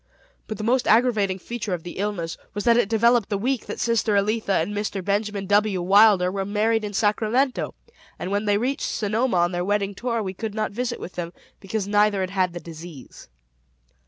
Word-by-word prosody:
But 215 - -5
the 215 - -5
most 245 +3 +1
aggravating 215 -5 +3
feature 210 -1 -4
of 165 - -10
the 175 - -8
illness 195 -5 -2 0.2
was 205 - -2
that 235 -1 +5
it 235 -4 +2
developed 230 -1 +3
the 205 - 0
week 250 +4 -2
that - - -6
sister 230 -2 +1
Elitha 210 0 +1
and 170 +6 -2
Mr. 205 -2 -3
Benjamin 205 0 -1
W. 205 -1 +2
Wilder 190 0 +5
were 195 0 -2
married 215 +3 +1
in 210 - -4
Sacramento; 220 +6 0 0.4
and 185 - -5
when 205 +1 0
they 205 -1 +3
reached 260 +6 -1
Sonoma 220 +1 0
on 175 +1 +2
their 175 0 -2
wedding 200 +1 0
tour, 230 +2 -2
we 190 -1 -4
could 215 +2 -5
not 215 -2 -1
visit 240 +3 -3
with 180 - -8
them, 175 -1 -5 0.3
because 200 0 -3
neither 205 -1 +3
had 185 0 -2
had 185 -3 0
the 175 - -5
disease. 160 - -11
205 Hz, 200 wpm, -24 LUFS, 190-225 Hz, 0.4 s, that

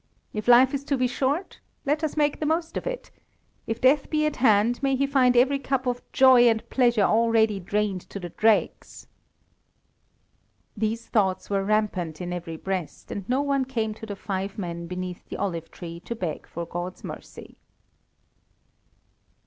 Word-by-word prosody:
If 215 +1 -4
life 250 +2 +7
is 280 0 -2
to 280 - 0
be 255 - +2
short, 275 +8 -1 0.3
let 300 +3 0
us 310 0 -2
make 295 -1 +1
the 310 - -2
most 325 +1 -1
of - - -3
it; - - -5 0.6
if 225 +1 -2
death 275 +3 +3
be 305 -1 +1
at 305 - -1
hand, 235 0 +3
may 270 -1 +2
he 275 +2 +1
find 255 -3 +3
every 270 +3 +4
cup 270 -1 -1
of 245 -1 -1
joy 255 -2 +7
and 225 -1 -1
pleasure 240 -5 +3
already 225 -1 +3
drained 200 0 -1
to 200 - -6
the 175 -2 -6
dregs." 220 +4 0 1.7
These 225 +2 -2
thoughts 195 -3 0
were 195 -1 +1
rampant 195 -6 -1
in 180 0 -4
every 165 -2 -5
breast, 185 -2 -5
and 200 +1 -6
no 260 +3 +2
one 280 -2 +1
came 230 -5 -2
to 220 +1 -10
the 205 - -5
five 195 0 -4
men 170 -3 -5
beneath 180 0 -6
the - - -5
olive 170 -4 -3
tree 170 -1 -8
to 235 +6 -6
beg 175 -8 -4
for 170 0 -5
God's 175 +2 -6
mercy. - - -10
225 Hz, 175 wpm, -25 LUFS, 190-265 Hz, 1.7 s, life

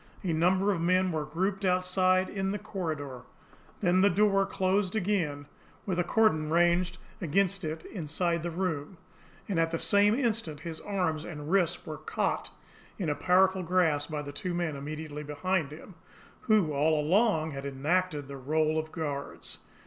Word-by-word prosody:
A 175 -4 0
number 185 +5 +3
of 175 -4 -1
men 185 +2 +2
were 155 -2 -2
grouped 190 +6 -2
outside 185 0 +2
in 195 -1 -2
the 205 - -1
corridor, 155 - -5 0.6
then 185 -1 +3
the 200 - +6
door 195 +1 +3
closed 190 +1 0
again 175 -9 0 0.4
with 185 -3 -1
a - - +3
cordon 170 -6 +2
ranged 175 +2 +2 0.2
against 195 +3 +1
it 160 0 -4
inside 170 -1 -1
the 175 - -3
room; 165 -2 -3 0.5
and 190 -5 0
at 165 0 +2
the 165 - -1
same 205 +4 +4
instant 225 - -1
his 160 -1 -6
arms 180 -6 -1
and 150 -2 -6
wrists 180 -3 +1
were 155 -3 -5
caught 155 - -2 0.5
in 180 -6 -2
a - - -1
powerful 185 +2 +3
grasp 165 -5 +1
by 150 -2 -3
the 145 - -6
two 175 +4 -3
men 170 -4 -1
immediately 150 +1 -6
behind 150 +2 -1
him, 165 +5 -11 0.6
who 200 -8 +4
all 150 +2 +2
along 160 0 +2
had 140 -1 -6
enacted 145 +2 -1
the 140 0 -7
role 155 +3 +1
of 155 0 -5
guards. 145 -4 -5
170 Hz, 165 wpm, -29 LUFS, 155-190 Hz, 0.6 s, the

